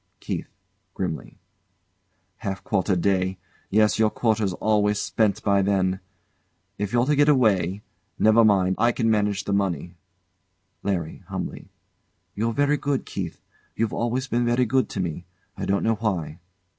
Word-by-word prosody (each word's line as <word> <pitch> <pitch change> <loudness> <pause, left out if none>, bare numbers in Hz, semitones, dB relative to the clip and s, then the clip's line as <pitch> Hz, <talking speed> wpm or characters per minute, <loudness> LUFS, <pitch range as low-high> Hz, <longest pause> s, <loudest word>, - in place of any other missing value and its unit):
KEITH. - - -4 0.5
[Grimly] 85 -5 -4 1.0
Half 95 -1 -4
quarter 95 -1 +1
day 95 +1 +1 0.3
yes, 105 +2 +3
your 110 -1 +4
quarter's 110 -4 0
always 105 +1 +1
spent 110 -1 0
by 100 -1 +3
then. 95 -1 +1 0.8
If 105 -1 -2
you're 120 0 +3
to 150 +2 +2
get 145 +1 +4
away 105 - +2 0.3
never 110 +1 +5
mind, 95 -3 +3
I 120 0 +3
can 115 -2 +1
manage 105 -2 +1
the 100 - -2
money. 90 -4 -1 0.9
LARRY. 90 -5 -2
[Humbly] - - -5 0.7
You're 115 +3 0
very 145 +3 +2
good, 140 -1 -1
Keith; 90 -4 -5 0.3
you've 115 -1 -1
always 125 +3 -1
been 120 -1 +1
very 120 +1 +2
good 130 +3 +1
to - - -5
me 85 -1 -3 0.3
I - - -4
don't 100 0 +1
know 115 - +3
why. 90 -8 -2
105 Hz, 145 wpm, -24 LUFS, 95-115 Hz, 1.0 s, never